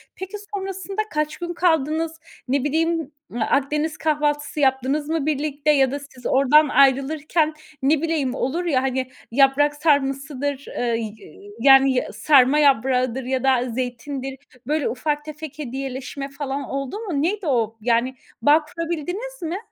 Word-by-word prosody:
Peki 380 Hz, +1 st, -8 dB, 0.2 s
sonrasında 390 Hz, +1 st, -3 dB
kaç 305 Hz, 0 st, -1 dB
gün 345 Hz, 0 st, -4 dB
kaldınız? 320 Hz, -1 st, 0 dB, 0.3 s
Ne 265 Hz, +1 st, +1 dB
bileyim, 320 Hz, +1 st, 0 dB, 0.2 s
eee, 240 Hz, -, -4 dB
Akdeniz 295 Hz, +6 st, 0 dB
kahvaltısı 295 Hz, -1 st, 0 dB
yaptınız 270 Hz, +2 st, +1 dB
mı 320 Hz, -3 st, 0 dB
birlikte 300 Hz, 0 st, 0 dB
ya 270 Hz, -3 st, +3 dB
da 285 Hz, -, -3 dB
siz 270 Hz, -3 st, -15 dB
oradan 285 Hz, +3 st, +5 dB
ayrılırken, 290 Hz, +4 st, +2 dB, 0.3 s
ne 285 Hz, +2 st, +3 dB
bileyim, 310 Hz, -6 st, 0 dB
olur 325 Hz, +9 st, -2 dB
ya, 280 Hz, -7 st, +2 dB
hani, 260 Hz, -1 st, -2 dB, 0.2 s
yaprak 275 Hz, +3 st, +4 dB
sarmasıdır, 280 Hz, -2 st, 0 dB
ııı, 235 Hz, -1 st, 0 dB
y 220 Hz, -2 st, -4 dB, 0.5 s
yani 270 Hz, +1 st, +6 dB
ya 250 Hz, -, -2 dB
sarma 265 Hz, +5 st, +5 dB
yaprağıdır 260 Hz, -2 st, +2 dB
ya 260 Hz, 0 st, -2 dB
da 255 Hz, -2 st, +2 dB
zeytindir, 260 Hz, +3 st, -4 dB, 0.3 s
böyle 300 Hz, 0 st, 0 dB
ufak 295 Hz, +3 st, -2 dB
tefek 305 Hz, -1 st, -8 dB
hediyeleşme 270 Hz, +1 st, -5 dB
falan 280 Hz, 0 st, -4 dB
oldu 275 Hz, -, -4 dB
mu? 350 Hz, -11 st, -2 dB
Neydi 375 Hz, +1 st, -1 dB
o? 230 Hz, -4 st, 0 dB
Yani 240 Hz, +3 st, +1 dB, 0.3 s
bağ 300 Hz, +2 st, +4 dB
kurabildiniz 350 Hz, +9 st, -5 dB
mi? 335 Hz, +2 st, -2 dB
285 Hz, 145 wpm, -22 LUFS, 265-310 Hz, 0.5 s, yani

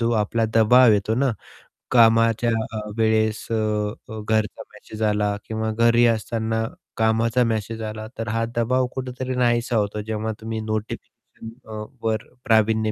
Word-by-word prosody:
जो 115 Hz, 0 st, +1 dB
आपला 115 Hz, +2 st, 0 dB
दबाव 115 Hz, +1 st, +6 dB
येतो 105 Hz, +2 st, +1 dB
ना, 135 Hz, +1 st, +2 dB, 0.6 s
कामाच्या 115 Hz, -1 st, +4 dB, 0.2 s
अ, 110 Hz, -, -3 dB, 0.2 s
वेळेस, 110 Hz, -1 st, +1 dB
अ, -, -, +2 dB, 0.5 s
जर 110 Hz, -1 st, -6 dB
घरचा 110 Hz, -1 st, 0 dB
मेसेज 110 Hz, 0 st, -8 dB
आला 105 Hz, 0 st, 0 dB
किंवा 110 Hz, 0 st, -2 dB
घरी 115 Hz, +2 st, +4 dB
असताना 110 Hz, 0 st, -2 dB, 0.3 s
कामाचा 115 Hz, +2 st, +2 dB
मेसेज 110 Hz, 0 st, -2 dB
आला 110 Hz, 0 st, -7 dB
तर 115 Hz, 0 st, -4 dB
हा 115 Hz, +1 st, 0 dB
दबाव 125 Hz, +2 st, +1 dB
कुठेतरी 130 Hz, 0 st, -4 dB
नाहीसा 120 Hz, -1 st, +1 dB
होतो 105 Hz, 0 st, -1 dB
जेव्हा 110 Hz, 0 st, -2 dB
तुम्ही 110 Hz, 0 st, -4 dB
नोटिफिकेशन 110 Hz, 0 st, -5 dB, 0.6 s
अ, 105 Hz, 0 st, -5 dB, 0.2 s
...वर 110 Hz, -1 st, -1 dB, 0.2 s
प्रावीण्य 110 Hz, -1 st, +3 dB
110 Hz, 145 wpm, -23 LUFS, 110-115 Hz, 0.6 s, दबाव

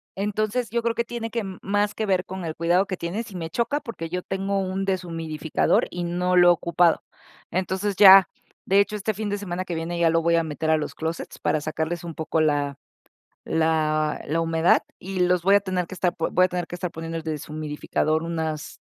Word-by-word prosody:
Entonces, 215 Hz, +4 st, -1 dB
yo 235 Hz, 0 st, 0 dB
creo 230 Hz, -1 st, 0 dB
que 235 Hz, -, +1 dB
tiene 230 Hz, -1 st, -5 dB
que, 230 Hz, -2 st, -2 dB
mm, 190 Hz, -2 st, -7 dB
más 205 Hz, +1 st, 0 dB
que 220 Hz, -, -2 dB
ver 190 Hz, -2 st, +1 dB
con 190 Hz, -2 st, -6 dB
el 160 Hz, -, -4 dB
cuidado 175 Hz, +4 st, +2 dB
que 185 Hz, -, -4 dB
tienes 185 Hz, +8 st, -4 dB
y -, -, -10 dB
me 165 Hz, -2 st, -4 dB
choca, 260 Hz, -, -1 dB
porque 230 Hz, -, -6 dB
yo 180 Hz, +1 st, -2 dB
tengo 195 Hz, +1 st, -2 dB
un 190 Hz, +1 st, -2 dB
deshumidificador 165 Hz, -4 st, 0 dB
y 175 Hz, 0 st, -4 dB
no 180 Hz, +1 st, 0 dB
lo 175 Hz, 0 st, +7 dB
he -, -, +8 dB
ocupado. 170 Hz, 0 st, +2 dB, 0.5 s
Entonces 190 Hz, +2 st, -1 dB
ya, 195 Hz, -2 st, +9 dB, 0.4 s
de 195 Hz, +1 st, +4 dB
hecho 200 Hz, +1 st, +1 dB
este 210 Hz, +1 st, -2 dB
fin 215 Hz, +1 st, -4 dB
de 205 Hz, -, -1 dB
semana 185 Hz, -2 st, -4 dB
que 175 Hz, -, -4 dB
viene 170 Hz, +1 st, -3 dB
ya 165 Hz, -1 st, +4 dB
lo 165 Hz, 0 st, +2 dB
voy 170 Hz, 0 st, +2 dB
a 165 Hz, -, +2 dB
meter 160 Hz, 0 st, -3 dB
a 160 Hz, -, +4 dB
los 150 Hz, -, -4 dB
closets 160 Hz, +1 st, -5 dB
para 155 Hz, -, +1 dB
sacarles 160 Hz, +3 st, -3 dB
un 165 Hz, -2 st, -7 dB
poco 160 Hz, 0 st, -1 dB
la 145 Hz, -2 st, +1 dB, 0.7 s
la 155 Hz, -1 st, +1 dB
la 165 Hz, +3 st, 0 dB
humedad 165 Hz, +1 st, +3 dB, 0.2 s
y 185 Hz, 0 st, -3 dB
los 180 Hz, 0 st, +3 dB
voy 195 Hz, +2 st, +5 dB
a 200 Hz, -, +4 dB
tener 185 Hz, -3 st, -2 dB
que 185 Hz, -, -8 dB
estar 180 Hz, -1 st, 0 dB
voy 185 Hz, +2 st, +2 dB
a -, -, +1 dB
tener 180 Hz, -1 st, -3 dB
que -, -, -6 dB
estar 175 Hz, -1 st, -4 dB
poniendo 165 Hz, 0 st, -5 dB
el 165 Hz, -, -6 dB
deshumidificador 155 Hz, 0 st, -2 dB
unas 160 Hz, -2 st, -3 dB
175 Hz, 220 wpm, -24 LUFS, 160-195 Hz, 0.7 s, ya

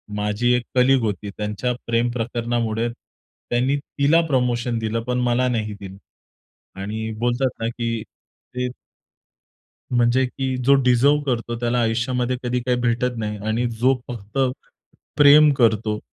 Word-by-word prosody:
माझी 105 Hz, +4 st, 0 dB
1 125 Hz, -, -1 dB
कलीग 130 Hz, 0 st, +4 dB
होती. 105 Hz, -1 st, -3 dB
त्यांच्या 105 Hz, +4 st, -2 dB
प्रेमप्रकरणामुळे 115 Hz, -1 st, -1 dB
त्यांनी 125 Hz, +2 st, -4 dB
तिला 145 Hz, +3 st, +2 dB
प्रमोशन 125 Hz, -3 st, 0 dB
दिलं, 110 Hz, +1 st, -2 dB
पण 125 Hz, +1 st, -1 dB
मला 125 Hz, +1 st, +1 dB
नाही 110 Hz, -3 st, -2 dB
दिलं. 95 Hz, -1 st, -9 dB, 0.8 s
आणि 110 Hz, +2 st, -4 dB
बोलतात 120 Hz, +2 st, +1 dB
ना 115 Hz, -, 0 dB
की 115 Hz, -1 st, -3 dB
ते 125 Hz, 0 st, -8 dB, 1.3 s
म्हणजे 120 Hz, +2 st, +3 dB
की 130 Hz, 0 st, -3 dB
जो 140 Hz, +2 st, +6 dB
डिझर्व्ह 135 Hz, +4 st, +3 dB
करतो 120 Hz, -2 st, -2 dB
त्याला 120 Hz, +1 st, 0 dB
आयुष्यामध्ये 120 Hz, +2 st, 0 dB
कधी 125 Hz, 0 st, -1 dB
काही 125 Hz, 0 st, 0 dB
भेटत 120 Hz, +1 st, 0 dB
नाही. 105 Hz, -1 st, -3 dB
आणि 115 Hz, +3 st, 0 dB
जो 130 Hz, +2 st, +4 dB
फक्त 115 Hz, +1 st, -7 dB, 0.8 s
प्रेम 150 Hz, +1 st, +7 dB
करतो 110 Hz, -4 st, +2 dB
120 Hz, 130 wpm, -22 LUFS, 115-125 Hz, 1.3 s, प्रेम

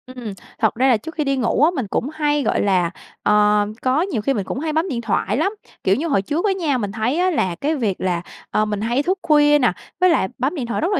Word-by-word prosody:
Ừm, 235 Hz, -5 st, -6 dB, 0.3 s
thật 220 Hz, -, +2 dB
ra 255 Hz, +3 st, +2 dB
là 250 Hz, -4 st, +5 dB
trước 320 Hz, +10 st, -9 dB
khi 310 Hz, -, 0 dB
đi 275 Hz, -1 st, 0 dB
ngủ 245 Hz, +2 st, +1 dB
á, 325 Hz, -, +5 dB
mình 255 Hz, -7 st, -2 dB
cũng 245 Hz, +7 st, -2 dB
hay 295 Hz, -2 st, +1 dB
gọi -, -, +1 dB
là, 185 Hz, -4 st, +2 dB, 0.3 s
ờ, 210 Hz, 0 st, +4 dB, 0.2 s
có 260 Hz, +4 st, +2 dB
nhiều 320 Hz, -, -1 dB
khi 275 Hz, -, +1 dB
mình 205 Hz, -, -1 dB
cũng 255 Hz, -, -4 dB
hay 310 Hz, +1 st, -2 dB
bấm 325 Hz, +4 st, 0 dB
điện 240 Hz, -4 st, -2 dB
thoại 210 Hz, -1 st, 0 dB
lắm. 390 Hz, +8 st, +1 dB, 0.3 s
Kiểu 190 Hz, -, +3 dB
như 320 Hz, +5 st, -2 dB
hồi 200 Hz, -11 st, +2 dB
trước 300 Hz, -, -2 dB
á 405 Hz, -, +3 dB
nha, 315 Hz, -8 st, 0 dB
mình 205 Hz, -5 st, -3 dB
thấy 230 Hz, +7 st, -1 dB
á 365 Hz, +1 st, +3 dB
là 185 Hz, -, 0 dB
cái 295 Hz, -, -1 dB
việc 215 Hz, -9 st, -2 dB
là, 175 Hz, -2 st, 0 dB, 0.3 s
ờ, 215 Hz, -, +2 dB
mình 210 Hz, -1 st, -3 dB
hay 240 Hz, +6 st, 0 dB
thức 375 Hz, +2 st, 0 dB
khuya 295 Hz, -2 st, +5 dB
nè, 245 Hz, -6 st, +3 dB, 0.3 s
với 365 Hz, -, +6 dB
lại 320 Hz, -, +2 dB
bấm 265 Hz, +8 st, -1 dB
điện 260 Hz, -7 st, -3 dB
thoại 235 Hz, -, -2 dB
rất 345 Hz, +5 st, 0 dB
là -, -, +2 dB
260 Hz, 280 wpm, -20 LUFS, 210-310 Hz, 0.3 s, với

